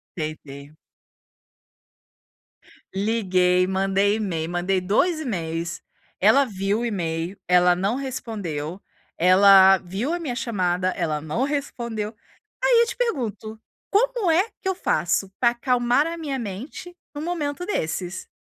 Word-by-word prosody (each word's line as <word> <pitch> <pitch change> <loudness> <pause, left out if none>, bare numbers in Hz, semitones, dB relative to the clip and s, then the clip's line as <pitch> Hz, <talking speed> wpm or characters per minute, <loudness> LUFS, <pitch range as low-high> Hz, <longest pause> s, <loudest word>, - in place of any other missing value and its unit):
Tentei. 150 -2 -7 2.2
Liguei, 185 -3 +2
mandei 195 +2 +1
e-mail, 170 -7 -2
mandei 180 +2 0
2 220 - +1
e-mails, 170 - -3 0.4
ela 280 0 +5
viu 200 -1 -1
o 240 - -2
e-mail, 175 -3 -3
ela 180 0 +5
não 195 +6 0
respondeu, 200 - -5 0.4
ela 190 +2 +7
viu 195 - -3
a 350 - -2
minha 285 -8 -4
chamada, 185 -6 0
ela 165 -5 -2
não 155 - -2
respondeu. 235 -6 -3 0.5
Aí - - +5
eu 470 - +2
te - - -5
pergunto, 225 - -3 0.3
como 470 -2 +1
é 360 +7 +3
que 380 - -5
eu 380 - -1
faço 195 - 0
para 235 -1 +4
acalmar 245 +2 +1
a 335 +1 -4
minha 290 -5 -3
mente 245 - -7 0.2
num 290 - -4
momento 325 -1 -3
desses? 180 - -3
205 Hz, 125 wpm, -23 LUFS, 180-275 Hz, 2.2 s, ela